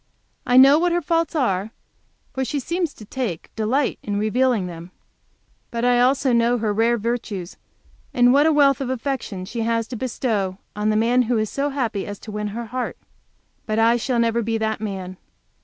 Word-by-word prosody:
I 250 Hz, -, +4 dB
know 275 Hz, +3 st, +8 dB
what 350 Hz, 0 st, +1 dB
her 350 Hz, -, +1 dB
faults 330 Hz, +1 st, 0 dB
are, 205 Hz, -8 st, 0 dB, 0.6 s
for 265 Hz, -, -1 dB
she 285 Hz, +2 st, -2 dB
seems 335 Hz, +3 st, -2 dB
to 215 Hz, -, -12 dB
take 215 Hz, -7 st, -5 dB
delight 245 Hz, +6 st, 0 dB
in 205 Hz, -1 st, -3 dB
revealing 220 Hz, 0 st, +1 dB
them. 170 Hz, 0 st, -8 dB, 0.8 s
But 235 Hz, 0 st, -2 dB
I 245 Hz, 0 st, +4 dB
also 260 Hz, +1 st, +3 dB
know 235 Hz, +1 st, +3 dB
her 215 Hz, -2 st, -1 dB
rare 230 Hz, +3 st, +2 dB
virtues, 215 Hz, -5 st, -4 dB, 0.6 s
and 245 Hz, 0 st, +4 dB
what 290 Hz, +3 st, +5 dB
a -, -, +4 dB
wealth 280 Hz, -2 st, +4 dB
of 260 Hz, -, -2 dB
affection 255 Hz, -7 st, -3 dB
she 230 Hz, +4 st, -4 dB
has 230 Hz, 0 st, 0 dB
to 250 Hz, -, -5 dB
bestow 220 Hz, -6 st, -2 dB, 0.2 s
on 210 Hz, +1 st, 0 dB
the 215 Hz, -, +2 dB
man 240 Hz, +3 st, +3 dB
who 245 Hz, -, +2 dB
is 215 Hz, -1 st, -1 dB
so 280 Hz, +1 st, -1 dB
happy 240 Hz, -8 st, -2 dB
as 205 Hz, 0 st, -6 dB
to 215 Hz, -, -9 dB
win 210 Hz, 0 st, -3 dB
her 230 Hz, +3 st, -5 dB
heart. 250 Hz, +2 st, -4 dB, 0.7 s
But 215 Hz, 0 st, -1 dB
I 225 Hz, +1 st, +4 dB
shall 245 Hz, +1 st, -1 dB
never 230 Hz, 0 st, +2 dB
be 225 Hz, 0 st, -1 dB
that 220 Hz, -1 st, -2 dB
man. 190 Hz, -3 st, -5 dB
235 Hz, 195 wpm, -22 LUFS, 215-260 Hz, 0.8 s, know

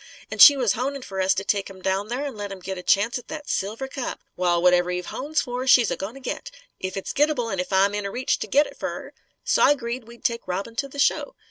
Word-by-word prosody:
An' -, -, -6 dB
she 285 Hz, -2 st, +10 dB
was 245 Hz, -6 st, +2 dB
honin' 275 Hz, +2 st, -3 dB
fer 190 Hz, -4 st, -4 dB
us 190 Hz, 0 st, +3 dB
to 195 Hz, -, -2 dB
take 200 Hz, -1 st, -1 dB
him 190 Hz, -1 st, -12 dB
down 190 Hz, +2 st, -1 dB
there 250 Hz, +5 st, -3 dB
an' 275 Hz, -5 st, -5 dB
let 205 Hz, -1 st, -6 dB
him 195 Hz, -, -6 dB
git 190 Hz, +1 st, -5 dB
a 180 Hz, -, -7 dB
chance 205 Hz, +7 st, +2 dB
at 245 Hz, -, -16 dB
that 305 Hz, -2 st, -7 dB
silver 220 Hz, +7 st, -2 dB
cup. 265 Hz, -2 st, -5 dB, 0.2 s
Wal, 175 Hz, -1 st, +1 dB
whatever 180 Hz, 0 st, +4 dB
Eve 180 Hz, 0 st, -3 dB
hones 290 Hz, -, -2 dB
fer, 250 Hz, +1 st, -4 dB
she's 245 Hz, -4 st, +6 dB
a -, -, 0 dB
goin' 200 Hz, +6 st, -6 dB
to -, -, -10 dB
git 260 Hz, -, -5 dB, 0.3 s
if 185 Hz, +1 st, -4 dB
it's 195 Hz, -, -4 dB
gittable 285 Hz, -6 st, +1 dB
an' 190 Hz, -, -2 dB
if 180 Hz, -, -3 dB
I'm 195 Hz, +1 st, +3 dB
in 205 Hz, -1 st, -2 dB
reach 250 Hz, +5 st, -1 dB
to -, -, -4 dB
git 290 Hz, +2 st, +4 dB
it -, -, -12 dB
fer -, -, -2 dB
her. -, -, -8 dB, 0.3 s
So -, -, +2 dB
I 290 Hz, -, +6 dB
'greed 235 Hz, -2 st, -5 dB
we'd 235 Hz, 0 st, -14 dB
take 235 Hz, -3 st, -1 dB
Robin 195 Hz, +5 st, -4 dB
to 280 Hz, -, -1 dB
the 275 Hz, -, -12 dB
show. 390 Hz, -, +1 dB
225 Hz, 275 wpm, -24 LUFS, 190-265 Hz, 0.3 s, she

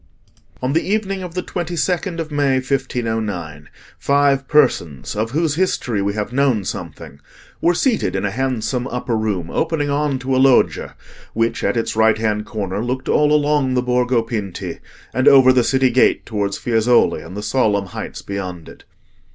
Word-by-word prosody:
On 130 Hz, +2 st, 0 dB
the 165 Hz, -, +2 dB
evening 195 Hz, -2 st, -2 dB
of 180 Hz, -2 st, -7 dB
the 180 Hz, -, -2 dB
22nd 175 Hz, +1 st, -2 dB
of 160 Hz, -2 st, -4 dB
May 145 Hz, -2 st, +1 dB
1509, 110 Hz, -, -3 dB, 0.3 s
five 140 Hz, -1 st, +2 dB
persons, 105 Hz, -, +1 dB
of 110 Hz, +2 st, -1 dB
whose 155 Hz, +3 st, 0 dB
history 140 Hz, -, 0 dB
we 100 Hz, +1 st, -1 dB
have 105 Hz, +3 st, -3 dB
known 130 Hz, -7 st, +1 dB
something, 70 Hz, -, -7 dB, 0.4 s
were 175 Hz, +1 st, +3 dB
seated 245 Hz, +3 st, 0 dB
in -, -, -1 dB
a 100 Hz, -, -1 dB
handsome 125 Hz, +1 st, -2 dB
upper 125 Hz, -2 st, -3 dB
room 100 Hz, -6 st, -2 dB
opening 155 Hz, -3 st, -1 dB
on 145 Hz, -1 st, 0 dB
to 130 Hz, 0 st, -2 dB
a 130 Hz, -, +3 dB
loggia 135 Hz, -2 st, +3 dB, 0.4 s
which, 115 Hz, +1 st, -1 dB
at -, -, 0 dB
its 115 Hz, -, -1 dB
right 110 Hz, 0 st, +4 dB
hand 105 Hz, -1 st, -1 dB
corner, 100 Hz, -1 st, -3 dB
looked 130 Hz, +2 st, -3 dB
all 150 Hz, 0 st, +3 dB
along 145 Hz, -3 st, +2 dB
the 125 Hz, -, +1 dB
Borgo 125 Hz, -1 st, +1 dB
Pinti, 105 Hz, -5 st, -5 dB, 0.3 s
and 130 Hz, +2 st, +1 dB
over 130 Hz, -2 st, +7 dB
the 125 Hz, -1 st, +3 dB
city 130 Hz, 0 st, +2 dB
gate 125 Hz, +1 st, +3 dB
towards 100 Hz, -3 st, -2 dB
Fiesole 120 Hz, +1 st, +2 dB
and 90 Hz, +5 st, -9 dB
the 105 Hz, -, -5 dB
solemn 105 Hz, -3 st, +1 dB
heights 95 Hz, -, -7 dB
beyond 90 Hz, -4 st, -6 dB
it. -, -, -15 dB
125 Hz, 170 wpm, -19 LUFS, 105-145 Hz, 0.4 s, over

